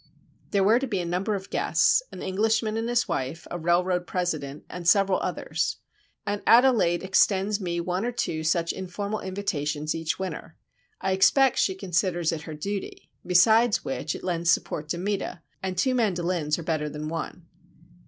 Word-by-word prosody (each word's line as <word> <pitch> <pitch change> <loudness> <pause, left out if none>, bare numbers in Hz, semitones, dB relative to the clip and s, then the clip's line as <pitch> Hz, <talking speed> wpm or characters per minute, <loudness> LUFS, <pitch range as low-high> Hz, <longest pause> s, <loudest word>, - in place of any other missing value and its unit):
There 200 -2 +2
were 220 +5 +5
to 270 - -3
be 200 -6 -1
a 175 - -2
number 185 +5 -1
of 195 -1 -7
guests: - - +3
an - - -8
Englishman 215 +3 0
and 225 +1 -2
his 240 0 +1
wife, 135 +6 -3
a 175 - -3
railroad 180 +2 +1
president, 155 -6 -3
and 175 -1 -1
several 195 0 +4
others. - - -2 0.5
Aunt 205 0 -2
Adelaide 230 -8 +5
extends 195 +2 +2
me 175 -2 -2
one 180 +3 -2
or 240 - -1
two 160 -9 -2
such 165 +1 +1
informal 200 +3 -4
invitations 155 -6 -2
each 165 -1 -2
winter. 190 -1 -6 0.4
I 190 - 0
expect 245 +8 +4
she 190 - +2
considers 180 -3 0
it 165 -2 -4
her 155 - -5
duty,—besides 205 +4 +1
which 150 +3 -3
it - - -9
lends 170 -2 -1
support 150 -3 0
to 170 - -1
Meta, 195 -1 -3 0.2
and 185 -1 -3
two 255 +8 +2
mandolins 175 -9 0
are 170 - -6
better 155 -2 -1
than 150 +1 -6
one. 165 +1 -5
185 Hz, 170 wpm, -26 LUFS, 170-205 Hz, 0.5 s, were